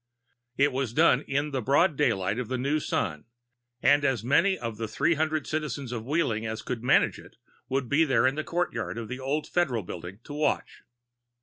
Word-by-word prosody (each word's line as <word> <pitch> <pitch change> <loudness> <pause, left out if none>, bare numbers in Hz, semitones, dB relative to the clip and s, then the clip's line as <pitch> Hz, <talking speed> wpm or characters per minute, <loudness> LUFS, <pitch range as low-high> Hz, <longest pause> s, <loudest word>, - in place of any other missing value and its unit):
It 140 +1 +4
was 130 -3 -2
done 155 -5 +5
in 145 +2 -1
the 135 -2 -1
broad 145 - +3
daylight 115 -6 +1
of 125 - -3
the 130 - -2
new 140 +5 0
Sun, 75 - -2 0.6
and 145 +1 +5
as 135 -5 +1
many 185 +10 +3
of 115 -2 -5
the 115 - -3
three 110 +9 +1
hundred 155 0 -1
citizens 145 -4 -3
of 115 -1 -5
Wheeling 140 -8 0
as 110 0 -4
could 125 -3 -4
manage 125 - +3
it - - -16 0.3
were 135 -1 +2
in 130 - +1
the 155 +2 -3
courtyard 165 -11 -2
of 115 -2 -5
the 130 - -5
old 140 +3 -1
Federal 130 - 0
Building 90 +2 -8
to 145 - -9
watch. 150 +1 -1
135 Hz, 190 wpm, -27 LUFS, 115-150 Hz, 0.6 s, done